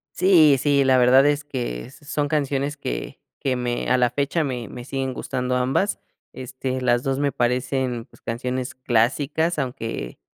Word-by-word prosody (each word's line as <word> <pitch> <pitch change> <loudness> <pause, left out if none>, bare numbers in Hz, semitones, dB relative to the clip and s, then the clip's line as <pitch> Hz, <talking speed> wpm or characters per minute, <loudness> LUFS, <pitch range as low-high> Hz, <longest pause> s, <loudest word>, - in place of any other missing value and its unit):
Sí, 165 -6 +6
sí, 140 +1 +3
la 130 -1 +4
verdad 130 +2 +6
es 145 0 +1
que 125 - -5
son 145 0 -3
canciones 140 -1 -1
que - - -5 0.2
que 130 -2 0
me 120 -1 -2
a 130 - +4
la 125 -1 +3
fecha, 140 +6 0
me 125 -5 -4
me 120 - -8
siguen 135 0 -3
gustando 125 -1 -2
ambas. 130 +11 0 0.3
Este, 130 0 -4
las 120 -1 +2
2 135 -1 0
me 140 -1 +1
parecen, 125 0 -1
pues, - - -22
canciones 125 +4 -3
clásicas, 140 +7 +1
aunque 115 - -4
130 Hz, 165 wpm, -23 LUFS, 125-145 Hz, 0.3 s, Sí